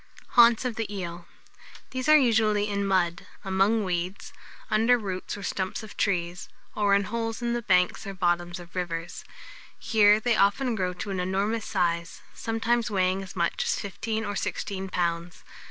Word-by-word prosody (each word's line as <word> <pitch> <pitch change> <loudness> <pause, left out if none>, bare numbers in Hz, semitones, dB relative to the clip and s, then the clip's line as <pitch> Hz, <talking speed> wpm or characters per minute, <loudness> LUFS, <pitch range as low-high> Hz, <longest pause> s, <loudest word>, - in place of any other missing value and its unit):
HAUNTS 235 0 +6
OF 245 -3 -2
THE 225 -2 -3
EEL. 175 -2 -6 0.6
These 255 +2 -2
are 305 - +9
usually 220 -5 +3
in 200 -1 -1
mud, 180 -2 0 0.2
among 195 +3 +2
weeds, 180 0 -3 0.4
under 225 +3 +4
roots 195 -3 -5
or 200 - -8
stumps 195 +4 -3
of 215 - -10
trees, 180 -2 -1 0.2
or 205 -1 +3
in 200 - +2
holes 225 +3 -3
in 235 0 0
the 240 - -1
banks 180 -3 +2
or 195 - -4
the - - -15
bottoms 175 0 0
of 175 -1 -13
rivers. 170 -2 -4 0.5
Here 210 -2 +4
they 235 +1 +1
often 215 +6 +2
grow 185 -4 -1
to 195 +3 -5
an 190 - -2
enormous 200 +4 -1
size, 170 -3 -1
sometimes 230 +1 0
weighing 190 -1 +1
as 190 -2 -9
much 170 -2 0
as - - 0
fifteen 220 +3 -3
or 205 0 -3
sixteen 195 -1 -3
pounds. 170 -1 -2
200 Hz, 170 wpm, -27 LUFS, 180-220 Hz, 0.6 s, are